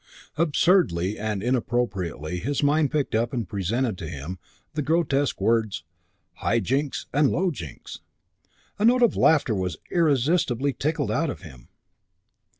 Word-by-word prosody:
Absurdly 150 - +2
and 105 -2 -2
inappropriately 95 - -1
his 140 +9 -2
mind 145 0 +3
picked 150 -2 -1
up 115 +3 0
and 115 -6 -2
presented 105 +3 -1
to 80 -4 -6
him 85 +4 -6 0.3
the 155 - -1
grotesque 145 -2 +1
words, 110 -6 +1 0.5
"High 115 - +1
Jinks 135 +7 -1
and 145 0 +4
Low 185 +1 +1
Jinks." 80 - -9 0.8
A 210 - +2
note 245 +1 +5
of 235 - +3
laughter 150 -7 +3
was 90 -5 -2
irresistibly 140 -4 +2
tickled 155 +5 -1
out 165 0 0
of - - -6
him. 65 -9 -13
125 Hz, 140 wpm, -25 LUFS, 95-150 Hz, 0.8 s, note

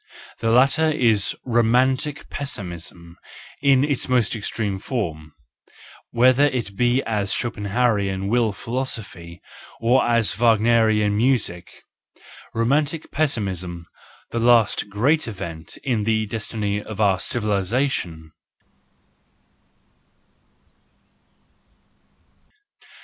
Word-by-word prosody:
The 115 - 0
latter 135 +7 +4
is 115 -9 +1
romantic 130 +4 +1
pessimism 85 -9 -7 0.4
in 135 -2 +4
its 145 -3 -1
most 120 -3 +2
extreme 105 -2 -3
form, 85 - -4 0.8
whether 130 +4 +4
it 120 -8 -2
be 125 +4 +2
as 105 -3 -1
Schopen 115 -4 -2
hauerian 100 -4 0
will 115 0 +2
philosophy, 100 -7 -6 0.4
or 120 +3 +3
as 115 -4 +2
Wagnerian 110 -2 +3
music 110 -7 -1 0.4
:— - - -19
romantic 145 +7 0
pessimism, 95 - -2 0.5
the 115 - -2
last 115 -3 +3
great 130 +10 +1
event 85 -6 -7
in 120 -6 0
the 110 0 +1
destiny 105 -1 -3
of 110 0 -9
our 100 -3 +3
civilisation. 100 - -1
115 Hz, 90 wpm, -22 LUFS, 100-125 Hz, 0.8 s, latter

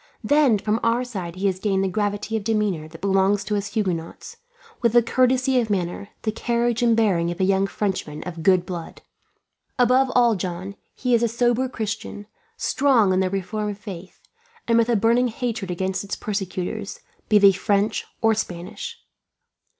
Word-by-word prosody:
Then 290 -6 +4
from 210 +2 -1
our 230 +2 +1
side 190 -9 -6
he 190 +2 -3
has 190 -2 +1
gained 195 -1 +1
the - - +1
gravity 205 +3 -2
of 220 - -2
demeanour 210 -7 0
that 165 +1 -13
belongs 195 +1 +2
to 210 - -2
us 200 -1 -2
Huguenots; 180 -6 -3 0.4
with 235 -2 +2
the 240 -1 +6
courtesy 255 +2 +2
of 230 -2 -1
manner, 195 +1 -2
the 215 - 0
carriage 235 +1 0
and 230 -2 +3
bearing 185 -7 +2
of 175 +1 -5
a - - +2
young 195 +1 +2
Frenchman 185 -8 -3
of 170 -2 -7
good 180 +1 +3
blood. 170 -2 -7 0.7
Above 255 +1 +3
all, 240 -2 +5
John, 185 0 -4 0.2
he 250 -1 -1
is 235 - +4
a 235 - +3
sober 240 +2 +1
Christian, 215 -3 -5 0.3
strong 250 -8 +3
in 185 - +2
the 190 -1 +1
reformed 205 +2 -3
faith, 190 -3 -9 0.5
and 230 - +3
with 230 +1 +2
a 235 - +3
burning 230 +4 +3
hatred 225 -4 -3
against 190 +2 -2
its 200 - -4
persecutors, 195 0 -4 0.3
be 215 - +6
they 200 -1 +7
French 205 +2 0 0.2
or 225 0 +5
Spanish. 195 - -5
205 Hz, 175 wpm, -23 LUFS, 190-235 Hz, 0.7 s, they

